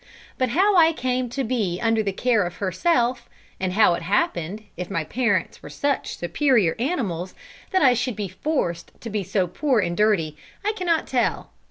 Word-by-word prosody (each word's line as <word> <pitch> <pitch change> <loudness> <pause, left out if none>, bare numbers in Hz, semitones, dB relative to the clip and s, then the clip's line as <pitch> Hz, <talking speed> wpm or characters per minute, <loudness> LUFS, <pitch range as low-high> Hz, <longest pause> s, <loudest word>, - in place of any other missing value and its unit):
But 255 -1 +2
how 380 - +3
I 330 -2 +6
came 255 -3 -1
to 270 +3 -2
be 215 -8 -1
under 225 -1 +2
the 200 -2 -1
care 230 +2 +2
of 175 0 -5
herself, 240 - 0 0.3
and 185 -1 -1
how 210 -3 +5
it - - -3
happened, 185 +1 -1
if 180 0 -5
my 165 - -1
parents 205 0 -1
were - - -10
such 285 -1 -2
superior 205 - +2
animals, 200 - -2 0.3
that 375 -4 +2
I 255 -2 +6
should 245 -1 -1
be 205 -1 -3
forced 185 - -3
to 230 - -7
be 210 0 -1
so 185 +1 0
poor 260 - 0
and 175 -3 -1
dirty, 195 -8 +2 0.3
I 425 - +3
cannot 345 -5 0
tell. 245 -3 -1
225 Hz, 185 wpm, -23 LUFS, 185-260 Hz, 0.3 s, I